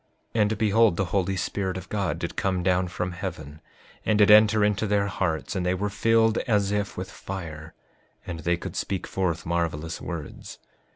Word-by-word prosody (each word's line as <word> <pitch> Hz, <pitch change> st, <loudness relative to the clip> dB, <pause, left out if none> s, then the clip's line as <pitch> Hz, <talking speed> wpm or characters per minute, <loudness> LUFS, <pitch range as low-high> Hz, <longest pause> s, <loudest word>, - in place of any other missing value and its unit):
5:45 115 Hz, -, +2 dB
And 105 Hz, 0 st, +2 dB
behold, 110 Hz, -3 st, +3 dB
the 100 Hz, -, +1 dB
Holy 95 Hz, +1 st, 0 dB
Spirit 95 Hz, 0 st, -2 dB
of 95 Hz, -1 st, -8 dB
God 100 Hz, -3 st, -1 dB
did -, -, -5 dB
come 95 Hz, -2 st, 0 dB
down 90 Hz, 0 st, +2 dB
from 90 Hz, +1 st, -3 dB
heaven, 75 Hz, -3 st, -7 dB, 0.4 s
and 110 Hz, -, +2 dB
did 105 Hz, 0 st, +6 dB
enter 105 Hz, 0 st, +7 dB
into 105 Hz, +1 st, 0 dB
their 100 Hz, 0 st, +2 dB
hearts, 90 Hz, -4 st, -2 dB
and 95 Hz, -, -1 dB
they 90 Hz, +1 st, +1 dB
were 100 Hz, +2 st, -2 dB
filled 110 Hz, +2 st, +3 dB
as 100 Hz, -4 st, +2 dB
if 105 Hz, 0 st, -2 dB
with 95 Hz, 0 st, -5 dB
fire, 80 Hz, -5 st, -7 dB, 0.5 s
and 85 Hz, -2 st, -5 dB
they 85 Hz, +2 st, 0 dB
could -, -, -7 dB
speak 95 Hz, -2 st, -2 dB
forth 90 Hz, -4 st, -2 dB
marvelous 80 Hz, -1 st, -2 dB
words. 85 Hz, -5 st, -7 dB
95 Hz, 185 wpm, -26 LUFS, 85-105 Hz, 0.5 s, enter